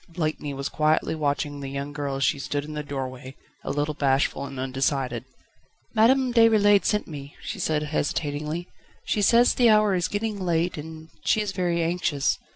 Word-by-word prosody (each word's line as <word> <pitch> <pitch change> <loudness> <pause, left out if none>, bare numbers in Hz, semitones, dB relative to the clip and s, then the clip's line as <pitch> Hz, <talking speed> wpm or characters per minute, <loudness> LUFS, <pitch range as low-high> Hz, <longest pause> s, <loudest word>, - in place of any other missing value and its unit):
Blakeney 155 -3 -3
was 140 +1 -3
quietly 155 +1 +1
watching 145 -1 -1
the 135 -1 -5
young 140 +1 -5
girl 145 -2 -3
as 135 - -1
she 140 - +2
stood 145 +1 -3
in 155 - -7
the 150 - -3
doorway, 135 -2 -6 0.3
a - - -5
little 145 +2 -1
bashful 140 -1 +1
and 135 -1 -8
undecided. 130 -2 -1 0.7
"Madame 250 +3 +4
Déroulède 215 -3 +5
sent 210 -1 +1
me," 145 -2 -9
she - - -5
said 150 -1 0
hesitatingly, 150 +2 -2 0.4
"she 210 - 0
says 235 +4 +5
the 240 -2 +4
hour 215 -2 +5
is 175 -2 +1
getting 210 0 -3
late 170 0 0
and 160 +1 -9
she - - +2
is 210 -2 -1
very 175 -3 0
anxious. 165 -3 0
155 Hz, 175 wpm, -25 LUFS, 140-185 Hz, 0.7 s, Déroulède